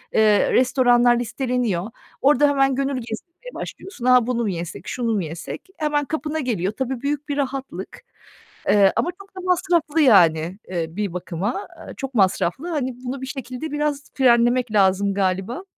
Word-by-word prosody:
ııı, 215 -2 +4
restoranlar 245 -1 +4
listeleniyor. 240 -6 -1 0.3
Orada 290 +1 +5
hemen 270 -1 +2
gönül 275 +1 -1
gezdirmeye 335 - -9
başlıyorsun. 365 -10 -8
"A, 250 -2 +5
bunu 245 -1 0
mu 215 - 0
yesek, 170 -2 -6
şunu 235 -2 -1
mu 200 -4 0
yesek?" 160 +1 -6 0.2
Hemen 295 -1 0
kapına 315 +1 -3
geliyor. 210 - -1
Tabii, 260 -2 -3
büyük 290 +1 -3
bir 285 - -2
rahatlık. 270 -9 -4 0.7
Iıı, 200 -2 +5
ama 345 - +1
çok 395 0 -18
da - - -5
masraflı, 345 -3 +1
yani, 175 - +4
ııı, 165 -2 -3
bir 205 -3 -2
bakıma, 185 - -3 0.2
eee, - - -8
çok 270 -1 -5
masraflı. 195 - +1
Hani, 260 -6 -2
bunu 260 +2 -4
bir - - -4
şekilde 265 +2 -6
biraz 295 -1 -2
frenlemek 245 -1 +3
lazım 195 0 +3
galiba. 195 - -1
250 Hz, 160 wpm, -22 LUFS, 200-285 Hz, 0.7 s, Orada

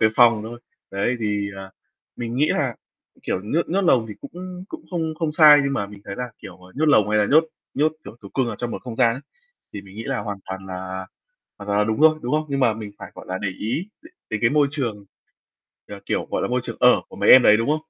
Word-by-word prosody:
cái 110 - +5
phòng 115 -3 +5
thôi. 120 +2 -8 0.3
Đấy 100 +6 0
thì, 105 -2 -1
ờ, 95 0 -9 0.5
mình 120 0 -4
nghĩ 150 +3 +3
là, 130 -5 0 0.5
kiểu, 95 - -2
nhốt 155 +11 -1
nhốt 190 +4 +1
lồng 120 -10 +3
thì 105 - -7
cũng 180 +1 -8
cũng 325 0 -9
không 160 -3 -2
không 160 -3 -1
sai 150 -2 +8
nhưng 140 - 0
mà 100 -7 -1
mình 100 0 -13
thấy 100 - -6
là, 125 -1 -4
kiểu, 95 -4 -11
à, 90 0 -17
nhốt 155 +3 0
lồng 110 -8 +4
hay 105 - +3
là 105 - +4
nhốt 155 +3 +6 0.3
nhốt, 155 +3 +2
kiểu, 110 - -10
thú 100 - -9
cưng 130 -3 +1
ở 105 - -5
trong 120 -1 -4
một - - -6
không 120 -3 -7
gian 120 -3 +3
ấy, 135 - -8 0.5
thì 100 - -7
mình 100 +1 -15
nghĩ 115 - -6
là 135 -2 -2
hoàn 100 -2 -5
toàn 95 0 -7
là 95 0 -6 0.5
hoàn 100 - -9
toàn 100 0 +1
là 105 - +3
đúng 110 +4 -1
thôi, 155 0 +6
đúng 125 - -3
không? 155 0 +1
Nhưng 140 -1 -1
mà 115 -4 +3
mình 105 -2 -8
phải, - - -9
gọi - - -11
là, 95 0 -3
để 100 - -2
ý 115 - -3
đ - - -13 0.2
đến 110 - -2
cái 115 - +3
môi 145 -1 +4
trường, 115 -9 -3 0.8
ờ, - - -9
kiểu, - - -1
gọi - - 0
là, - - 0
môi 125 +1 0
trường - - -6
ở 125 0 +5
của - - -12
mấy - - +1
em 130 - +10
đấy, 105 - +7
đúng 115 - -1
không? 150 - +3
115 Hz, 270 wpm, -22 LUFS, 105-145 Hz, 0.8 s, em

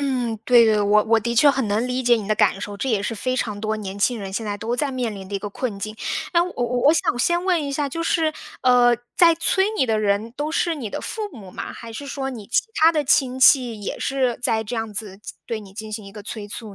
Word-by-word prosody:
嗯， 250 -5 -1
对 240 -1 +6
的， 210 -2 +3
我 210 +1 +4
我 225 0 +3
的 235 +2 -2
确 285 +5 +6
很 270 -4 -1
能 210 +4 0
理 255 0 -2
解 240 0 +5
你 215 -2 -3
的 215 - +3
感 195 - +2
受， 205 -1 -6
这 265 - -3
也 215 -5 +1
是 225 +2 -3
非 255 +4 -1
常 210 -5 -2
多 220 0 -1
年 200 -1 -6
轻 245 +4 +2
人 195 -1 -6
现 220 +2 -3
在 205 0 -2
都 230 +3 -3
在 280 -1 -1
面 245 -4 -2
临 190 -2 -9
的 200 - -6
一 - - 0
个 205 - -5
困 220 -1 -4
境。 215 +2 -5 0.4
那 340 0 +4
我 360 - -6
我 245 0 -1
我 300 - +7
想 245 -6 0
先 345 +8 +1
问 355 -5 +2
一 280 - -4
下， 285 0 -1
就 330 +5 -5
是， 325 -1 +1 0.3
呃， 245 -1 +5 0.2
在 335 -2 +6
催 380 +3 +1
你 - - +3
的 220 -3 +1
人 210 +2 0
都 300 +2 -3
是 335 -1 0
你 240 -7 -5
的 - - -5
父 445 - -5
母 195 -5 -11
吗？ - - -6
还 230 -1 -10
是 280 +5 -7
说 270 -1 -4
你 220 -6 -8
其 - - +2 0.2
他 325 +1 +7
的 305 - +1
亲 260 -1 +2
戚 245 -5 +5
也 - - -4
是 260 -3 0
在 220 -2 +1
这 230 +2 -5
样 225 -1 -4
子 205 -2 -6
进 - - -10
对 230 - -3
你 200 -3 -12
进 215 +1 -8
行 210 -2 -6
一 195 - -11
个 210 - -9
催 210 0 -6
促 210 0 -8
235 Hz, 295 characters per minute, -22 LUFS, 210-270 Hz, 0.4 s, 我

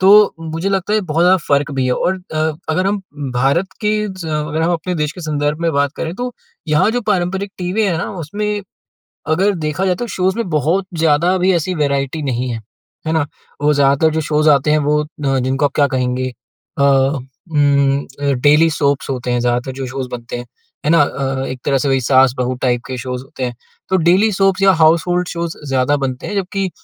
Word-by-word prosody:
तो 205 +2 +6
मुझे 165 +3 -3
लगता 195 +1 -1
है - - +4
ये - - -2
बहुत 165 +2 +2
ज़्यादा 180 +2 +6
फ़र्क 140 +1 +2
भी 135 -2 0
है। 125 - +1
और 185 - 0 0.2
अ, - - -2 0.3
अगर 185 +4 +1
हम 200 0 -1 0.3
भारत 140 +9 +2
के 210 -1 +1 0.2
ज़ 185 -3 -7
अगर 150 +1 -1
हम 170 +2 +2
अपने 175 +2 -2
देश 150 -2 -1
के 180 - -10
संदर्भ 150 -1 -1
में 165 -1 +1
बात 140 0 +1
करें 165 +1 -3
तो 245 +2 -3 0.4
यहाँ 150 +7 +3
जो 245 +2 -1
पारंपरिक 190 +2 -1
टीवी 185 +4 -1
है 185 -5 +1
ना - - -3
उसमें 205 +6 -3 0.7
अगर 185 +6 +2
देखा 155 +5 -1
जाए 185 -1 +2
तो 240 - -2
शोज़ 190 -2 0
में 230 -6 -2
बहुत 165 +5 +1
ज़्यादा 165 +4 +3
भी 185 +1 +3
ऐसी 170 +2 -1
वैराइटी 140 0 -1
नहीं 125 -2 -1
है। 115 -2 -3 0.5
है - - +1
ना? 160 - +2 0.4
वो 150 +1 +3
ज़्यादातर 140 +2 +3
जो 160 - 0
शोज़ 155 0 +2
आते 145 0 +4
हैं 155 - +4
वो 150 0 +1
अ, - - -10 0.3
जिनको 135 +3 0
आप - - 0
क्या 145 -1 +4
कहेंगे 125 0 0 0.5
अ, - - +4
उम, 140 +1 +1 0.2
अ, 140 -1 +1
डेली 150 +3 +5
सोप्स 140 -3 0
होते 125 -2 -2
हैं 120 - +1
ज़्यादातर 120 +2 0
जो - - -2
शोज़ 130 0 -4
बनते 120 0 -5
हैं। 120 - -7 0.4
है - - +2
ना? 165 -2 +6
अ, 135 -1 -2
एक 130 0 -5
तरह 140 -2 +2
से 135 +2 -1
वहीं 135 -1 +3
सास-बहू 130 -1 +3
टाइप 120 -2 +1
के 130 - -4
शोज़ 125 0 -5
होते 135 -1 -7
हैं। 120 -1 -5 0.3
तो 190 - +3
डेली 185 +6 +4
सोप्स 195 0 +2
या 195 0 +6
हाउसहोल्ड 175 +3 +3
शोज़ 170 -1 -4
ज़्यादा 135 +2 +2
बनते 130 -1 -4
हैं 205 - -4
जबकि 195 0 -1
150 Hz, 215 wpm, -17 LUFS, 135-180 Hz, 0.7 s, तो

